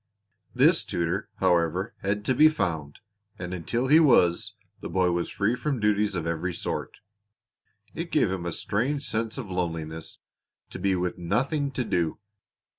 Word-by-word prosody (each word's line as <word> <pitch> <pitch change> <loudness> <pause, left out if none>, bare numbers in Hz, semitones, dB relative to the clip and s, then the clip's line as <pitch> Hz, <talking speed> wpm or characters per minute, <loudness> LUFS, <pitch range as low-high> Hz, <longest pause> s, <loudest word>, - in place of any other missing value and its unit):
This - - +4
tutor, 85 +4 -2
however, 90 +3 +1
had 105 +2 -2
to 130 - +2
be 155 +5 +7
found, 80 - -3 0.4
and 90 0 -5
until 115 +8 -2
he 155 +4 +7
was 105 - +4 0.2
the - - -6
boy 90 -2 +2
was 85 0 -1
free 110 +4 0
from 140 -1 -2
duties 105 -1 +1
of 85 -2 -2
every 85 +2 -2
sort. - - -4 0.9
It - - -5
gave - - +3
him 90 -2 -3
a - - -2
strange 135 - -1
sense 110 +2 -2
of 115 -8 -6
loneliness 80 -3 -4 0.5
to - - -7
be 95 0 +1
with 90 0 -2
nothing 135 - 0
to 130 - -1
do. 85 -6 0
95 Hz, 160 wpm, -26 LUFS, 85-115 Hz, 0.9 s, be